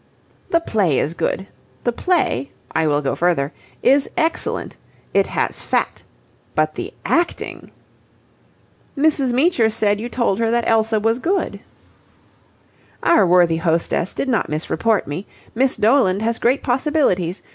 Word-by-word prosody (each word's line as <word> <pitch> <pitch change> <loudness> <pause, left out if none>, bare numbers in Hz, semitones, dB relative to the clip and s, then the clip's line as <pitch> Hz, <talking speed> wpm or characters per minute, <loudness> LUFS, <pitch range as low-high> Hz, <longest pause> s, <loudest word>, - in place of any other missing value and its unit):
"The 335 - +3
play 200 - +1
is 150 - 0
good. 190 +2 -2 0.4
The 240 - +1
play 235 - 0 0.2
I 160 0 +1
will 145 -1 +1
go 135 - -1
further 165 -5 0 0.3
is 275 +1 +4
excellent. 320 +1 -1 0.4
It - - +3
has - - -2
fat. - - -1 0.5
But - - +1
the - - -6
acting..." 340 +1 -1 1.3
"Mrs. 280 -3 +2
Meecher 255 -3 +3
said 210 -1 0
you 240 - -4
told 235 -4 0
her 230 -1 +1
that 235 0 +1
Elsa 220 -1 +2
was 225 +3 +1
good." 370 +8 -1 1.4
"Our 205 - +4
worthy 175 -2 +4
hostess 165 +2 0
did - - -2
not 245 -4 0
misreport 170 +8 0
me. 150 +8 -6 0.3
Miss 260 +3 +2
Doland 215 -3 +3
has 230 0 -1
great 255 +3 +1
possibilities. 245 - 0
225 Hz, 135 wpm, -20 LUFS, 175-260 Hz, 1.4 s, is